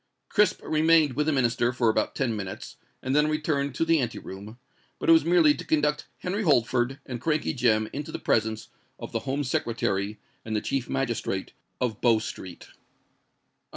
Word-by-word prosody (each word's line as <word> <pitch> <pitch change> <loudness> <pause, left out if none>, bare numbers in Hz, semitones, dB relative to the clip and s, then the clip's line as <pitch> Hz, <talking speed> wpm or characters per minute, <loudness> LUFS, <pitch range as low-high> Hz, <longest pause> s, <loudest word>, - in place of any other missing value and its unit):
Crisp 210 -3 +2
remained 155 -2 +3
with 150 +4 -1
the - - +3
Minister 120 -3 +1
for 120 -2 0
about 110 - +1
ten 115 -3 0
minutes, 95 -3 -6 0.3
and 130 +1 -1
then 150 +1 +4
returned 150 -3 -1
to 165 - +1
the 165 -1 +3
ante 120 -3 -2
room, 100 +4 -9 0.4
but - - -2
it - - +9
was 160 -2 +6
merely 165 -2 +5
to 135 - -7
conduct 150 -1 0
Henry 190 +4 -3
Holford 130 - +2
and 120 -3 -6
Crankey 155 +2 0
Jem 110 -5 +2
into 145 +1 -5
the - - -4
presence 110 0 0 0.3
of - - -8
the - - -1
Home 140 +2 0
Secretary 105 -5 -1 0.2
and 110 -1 -4
the - - +2
Chief 135 +2 -3
Magistrate 120 -7 -2 0.3
of 115 -4 -2
Bow 115 -2 +5
Street. 95 -5 -7
130 Hz, 180 wpm, -26 LUFS, 115-150 Hz, 0.4 s, it